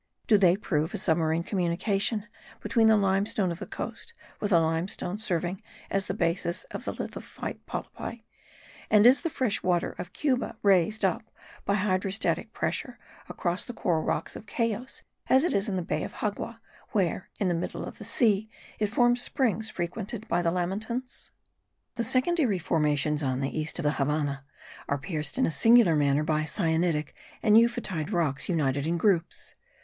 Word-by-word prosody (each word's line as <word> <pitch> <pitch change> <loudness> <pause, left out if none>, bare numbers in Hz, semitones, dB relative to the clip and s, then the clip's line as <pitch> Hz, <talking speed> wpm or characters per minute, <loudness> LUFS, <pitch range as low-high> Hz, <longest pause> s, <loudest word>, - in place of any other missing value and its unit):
Do 210 -3 +5
they 180 -2 +5
prove 160 -6 -1
a - - -1
submarine 160 0 +1
communication 195 +4 0 0.3
between 225 -1 +3
the 220 -1 +6
limestone 195 -1 +1
of 170 - -6
the - - -6
coast 465 - -6 0.3
with 205 - -1
the 175 -4 +5
limestone 165 +4 -1
serving 180 -3 -2 0.3
as 195 0 0
the 190 - -2
basis 170 -2 -1
of - - -7
lithophyte - - -5
polypi, 230 -1 -6 0.7
and 210 0 +6
is 255 +3 +7
the 335 - -1
fresh 255 -8 0
water 175 -2 +1
of 175 - -6
Cuba 255 -6 -1
raised 200 +1 +3
up 190 +4 -1 0.4
by 200 - +2
hydrostatic 195 0 0
pressure - - -3 0.3
across 175 +2 -1
the 245 - -8
coral 170 -7 +1
rocks - - -2
of 215 - -10
Cayos, 230 +3 -2 0.2
as 265 +2 +5
it 350 - +1
is 200 +2 +1
in 195 - -1
the 180 - -1
bay 170 - -2
of - - -6
Xagua, 220 +2 -3 0.3
where, 185 -3 0
in 200 - 0
the 175 - +2
middle 170 +1 -3
of - - -9
the - - -7
sea, 215 -3 +2 0.3
it 210 - +2
forms 240 +2 +3
springs 225 -5 0
frequented 210 +4 -4
by 175 - +1
the 170 - +2
lamantins? 215 +8 -3 0.6
The 235 - -2
secondary 255 - +2
formations 150 -2 +1
on 130 -2 -1
the 135 0 -2
east 155 0 -1
of 175 - -1
the 150 - +3
Havannah 140 -1 -1 0.4
are 140 - +1
pierced 150 -1 -3
in - - +3
a - - 0
singular 225 -2 +6
manner 145 0 +2
by 155 0 +1
syenitic 160 -2 0 0.3
and 215 -1 +5
euphotide 220 -8 +2
rocks 160 -6 0
united 145 -4 +1
in 170 +1 +1
groups. 175 -2 0
185 Hz, 170 wpm, -28 LUFS, 165-220 Hz, 0.7 s, is